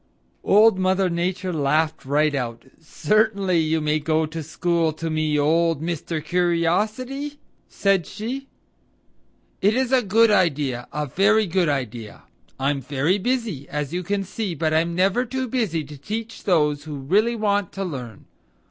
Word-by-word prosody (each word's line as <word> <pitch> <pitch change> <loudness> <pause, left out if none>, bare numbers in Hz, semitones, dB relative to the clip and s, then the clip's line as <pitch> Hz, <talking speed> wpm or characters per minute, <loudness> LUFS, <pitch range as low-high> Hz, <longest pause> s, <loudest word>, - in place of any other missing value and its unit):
Old 210 -1 +5
Mother 185 0 +2
Nature 180 +2 -2
laughed 155 +1 0
right 150 +2 +2
out. 120 -4 -3 0.2
"Certainly 200 +1 +1
you 160 0 +1
may 155 0 0
go 155 +1 +1
to 160 +1 -6
school 165 +1 0
to 165 +1 -4
me, 155 -1 0
old 165 +1 +2
Mr. 160 -1 -4
Curiosity," 210 - 0 0.3
said 195 -5 +1
she. 250 +6 -5 1.1
"It 205 +3 +3
is 260 0 0
a 260 -1 +4
good 225 +1 +4
idea; 145 -10 +1
a 150 0 -2
very 200 - +3
good 180 -2 +1
idea. 120 -6 -4 0.4
I'm 140 +1 0
very 145 +8 0
busy, 225 - -2
as 150 +1 -3
you 180 - -1
can 195 +2 -2
see, 195 -1 -4
but 155 0 0
I'm 165 +2 +1
never 195 +7 +2
too 260 +1 -3
busy 220 -11 -1
to 145 +1 -11
teach 220 +7 -6
those 150 -5 +2
who 150 -2 -6
really 200 - +1
want 205 -3 0
to 195 - -3
learn. 125 - -7
170 Hz, 155 wpm, -23 LUFS, 150-205 Hz, 1.1 s, Old